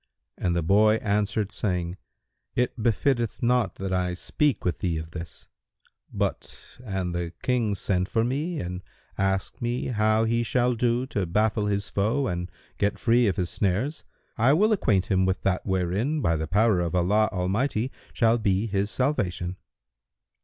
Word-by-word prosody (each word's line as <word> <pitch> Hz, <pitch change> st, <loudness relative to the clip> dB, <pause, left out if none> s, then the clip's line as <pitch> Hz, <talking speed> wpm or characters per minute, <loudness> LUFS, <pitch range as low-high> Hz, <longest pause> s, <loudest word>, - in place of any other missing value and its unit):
And 90 Hz, -1 st, -1 dB
the 85 Hz, -, 0 dB
boy 105 Hz, +5 st, +5 dB
answered, 105 Hz, -2 st, 0 dB
saying, 90 Hz, -5 st, -2 dB, 0.6 s
"It 125 Hz, 0 st, +1 dB
befitteth 120 Hz, +1 st, 0 dB
not 120 Hz, -4 st, +2 dB
that 95 Hz, -1 st, -3 dB
I 90 Hz, -1 st, 0 dB
speak 140 Hz, +6 st, 0 dB
with 90 Hz, -3 st, 0 dB
thee 85 Hz, -3 st, -1 dB
of 80 Hz, +1 st, -6 dB
this; 85 Hz, -1 st, -8 dB, 0.6 s
but, -, -, -3 dB, 0.2 s
an 95 Hz, -5 st, -2 dB
the 85 Hz, -1 st, -3 dB
King 120 Hz, -5 st, +1 dB
send 95 Hz, -1 st, -1 dB
for 115 Hz, -, +1 dB
me 150 Hz, +8 st, -2 dB
and 90 Hz, +1 st, -4 dB, 0.3 s
ask 95 Hz, 0 st, -1 dB
me 120 Hz, +2 st, -1 dB
how 110 Hz, -1 st, +2 dB
he 115 Hz, +1 st, +1 dB
shall 125 Hz, +2 st, +1 dB
do 120 Hz, +1 st, +1 dB
to 100 Hz, -8 st, -2 dB
baffle 105 Hz, +3 st, +1 dB
his 100 Hz, -1 st, -1 dB
foe 110 Hz, +8 st, +1 dB
and 90 Hz, -4 st, -3 dB, 0.3 s
get 100 Hz, 0 st, +1 dB
free 120 Hz, 0 st, +3 dB
of 95 Hz, -, +1 dB
his 90 Hz, -1 st, -2 dB
snares, 105 Hz, -, -1 dB, 0.4 s
I 125 Hz, +5 st, +5 dB
will 210 Hz, +8 st, +3 dB
acquaint 100 Hz, -, +2 dB
him 95 Hz, -1 st, +3 dB
with 95 Hz, 0 st, -1 dB
that 95 Hz, 0 st, 0 dB
wherein, 95 Hz, -, 0 dB
by 85 Hz, -, +1 dB
the 80 Hz, 0 st, -3 dB
power 105 Hz, +2 st, +3 dB
of 85 Hz, 0 st, -1 dB
Allah 105 Hz, +5 st, +3 dB
Almighty, 105 Hz, +7 st, -1 dB, 0.2 s
shall 115 Hz, -1 st, +3 dB
be 100 Hz, -1 st, +1 dB
his 100 Hz, -1 st, -1 dB
salvation." 95 Hz, -10 st, -1 dB
105 Hz, 165 wpm, -26 LUFS, 90-120 Hz, 0.6 s, boy